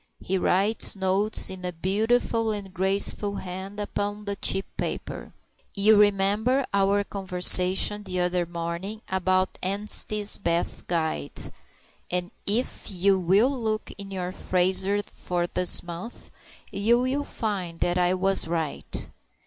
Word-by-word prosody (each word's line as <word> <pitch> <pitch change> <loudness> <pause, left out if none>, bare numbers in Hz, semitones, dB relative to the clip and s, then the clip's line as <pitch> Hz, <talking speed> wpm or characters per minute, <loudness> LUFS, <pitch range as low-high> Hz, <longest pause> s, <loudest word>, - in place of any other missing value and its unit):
He 190 +1 -2
writes 200 +6 +2
notes 195 +3 +2
in 190 -1 -8
a 180 - -2
beautiful 220 +6 0
and 200 -3 -6
graceful 195 +2 -1
hand 190 +2 -7
upon 205 0 -3
very 200 0 -3
cheap 195 0 +2
paper. - - -5 0.4
"You 210 +2 +5
remember 210 +6 +3
our 200 +1 +2
conversation 185 +1 +3
the 185 -3 -2
other 180 -1 0
morning 170 +5 -5
about 185 0 0
'Anstey's 205 +2 +1
Bath 170 -3 -2
Guide'; 160 - -2 0.6
and 180 +1 -2 0.2
if 225 +6 0
you 190 0 +2
will 195 +9 +3
look 220 -5 -3
in 200 -1 -8
your 185 -2 -4
Fraser 190 +2 +2
for 175 -3 -3
this 180 +1 +4
month, 175 +7 -9 0.4
you 225 +4 +2
will 260 +3 0
find 190 -10 -4
that 175 +1 +1
I 180 +1 +2
was 195 -1 +2
right." 160 -3 -4
195 Hz, 130 wpm, -25 LUFS, 180-205 Hz, 0.6 s, You